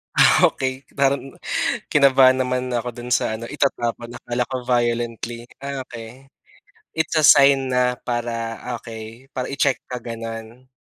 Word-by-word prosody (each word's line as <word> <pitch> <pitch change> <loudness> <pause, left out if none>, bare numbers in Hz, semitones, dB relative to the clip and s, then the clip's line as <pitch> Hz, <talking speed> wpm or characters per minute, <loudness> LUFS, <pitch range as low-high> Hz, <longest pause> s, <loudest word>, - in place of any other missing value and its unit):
Ah, - - +6
okey. 130 0 -2
Parang, 135 -1 0 0.6
kinabahan 130 -2 +5
naman 125 0 -1
ako 120 +1 -1
dun 120 +1 -7
sa 110 -2 +1
ano, 115 - -8
itatapon. 120 -3 -2
Akala 120 0 -3
ko 130 - -3
violently. 120 -1 -1 0.2
Ah, 140 -1 -5
okey. 120 +2 -11 0.7
It's 160 +1 -2
a 155 - +3
sign 140 -2 +6
na 125 0 +2
para 115 -2 -3 0.2
okey, 115 +3 -10
para 130 -2 -4
i-check 140 -1 +1
ka, 125 -2 -6
ganon. 115 +2 -8
125 Hz, 140 wpm, -22 LUFS, 115-135 Hz, 0.7 s, Ah